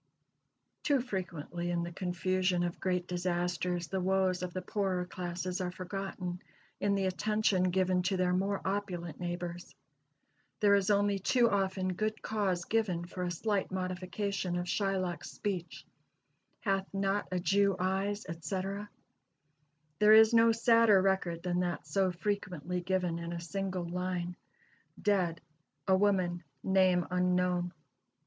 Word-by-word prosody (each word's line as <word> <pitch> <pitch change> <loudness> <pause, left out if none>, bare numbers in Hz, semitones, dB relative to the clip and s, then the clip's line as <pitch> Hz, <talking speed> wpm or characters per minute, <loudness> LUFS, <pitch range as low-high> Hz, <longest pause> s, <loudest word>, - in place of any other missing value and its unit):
Too 285 -2 +2
frequently 175 - -4
in 170 -1 0
the 170 - -5
confusion 185 0 0
of 175 0 -3
great 180 -2 0
disasters 175 0 -1
the 190 -1 -2
woes 185 -1 +1
of 180 -1 -3
the 185 +1 -4
poorer 185 -2 -1
classes 180 +1 -4
are 180 - -1
forgotten 185 -1 -5 0.4
in 200 0 +2
the 195 -1 0
attention 190 -1 +1
given 185 0 +2
to 190 - 0
their 180 0 +2
more 195 +2 0
opulent 185 -5 -3
neighbors. 175 0 -5 0.8
There 205 -1 +5
is 200 -1 +3
only 205 -1 +3
too 235 +4 +3
often 190 -2 0
good 215 +3 -2
cause 190 -5 0
given 195 -7 0
for 180 +1 -7
a 180 - -1
slight 200 +3 -1
modification 185 0 -2
of 175 - -2
Shylock's 185 -3 -1
speech, 185 -4 -4 0.8
"Hath 195 -2 0
not 195 +1 0
a 180 - 0
Jew 195 +2 +3
eyes?" 195 +3 -1
etc. 190 +5 -4 1.1
There 210 +1 +7
is 220 +1 +8
no 230 0 +6
sadder 230 -2 +5
record 185 -3 0
than 180 -1 0
that 175 -4 -2
so 185 +5 +1
frequently 180 -2 -3
given 180 -2 0
in 170 0 -5
a 170 - -4
single 185 +1 -3
line: 180 0 -3 0.6
"Dead 185 -5 +1 0.5
a 190 - +5
woman, 185 -3 +1 0.2
name 185 -2 +3
unknown." 180 -1 +1
185 Hz, 140 wpm, -32 LUFS, 175-195 Hz, 1.1 s, is